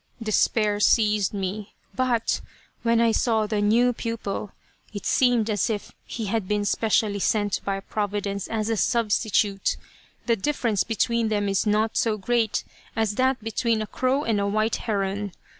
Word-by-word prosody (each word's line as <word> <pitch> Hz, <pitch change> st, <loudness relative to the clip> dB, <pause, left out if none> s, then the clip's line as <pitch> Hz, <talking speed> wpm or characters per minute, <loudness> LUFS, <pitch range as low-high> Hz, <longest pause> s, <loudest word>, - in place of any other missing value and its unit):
Despair 215 Hz, -1 st, +1 dB
seized 210 Hz, -2 st, +3 dB
me, 200 Hz, +1 st, -4 dB, 0.2 s
but 245 Hz, -3 st, 0 dB, 0.4 s
when 230 Hz, -1 st, +2 dB
I 230 Hz, -1 st, +4 dB
saw 220 Hz, -1 st, +1 dB
the 210 Hz, -1 st, -1 dB
new 235 Hz, +4 st, +3 dB
pupil 220 Hz, -3 st, -4 dB, 0.4 s
it 205 Hz, -, -6 dB
seemed 245 Hz, -4 st, +3 dB
as 210 Hz, -2 st, 0 dB
if 210 Hz, -2 st, -3 dB, 0.2 s
he 225 Hz, -, -4 dB
had 210 Hz, -1 st, -1 dB
been 210 Hz, 0 st, 0 dB
specially 210 Hz, -1 st, +1 dB
sent 205 Hz, 0 st, +1 dB
by 195 Hz, -1 st, -2 dB
Providence 200 Hz, -1 st, -3 dB
as 215 Hz, -1 st, -2 dB
a 225 Hz, -, 0 dB
substitute. 210 Hz, -3 st, +1 dB, 0.5 s
The 235 Hz, -, +3 dB
difference 230 Hz, -3 st, 0 dB
between 230 Hz, +1 st, 0 dB
them 205 Hz, -1 st, 0 dB
is 195 Hz, +2 st, 0 dB
not 215 Hz, +1 st, +1 dB
so 220 Hz, -2 st, +1 dB
great 225 Hz, +2 st, 0 dB, 0.3 s
as 220 Hz, -2 st, 0 dB
that 260 Hz, +1 st, +1 dB
between 225 Hz, 0 st, 0 dB
a 215 Hz, -, -2 dB
crow 260 Hz, +6 st, 0 dB
and 215 Hz, -6 st, 0 dB
a 200 Hz, -, 0 dB
white 215 Hz, +2 st, +1 dB
heron. 200 Hz, -2 st, -2 dB
215 Hz, 160 wpm, -25 LUFS, 205-230 Hz, 0.5 s, I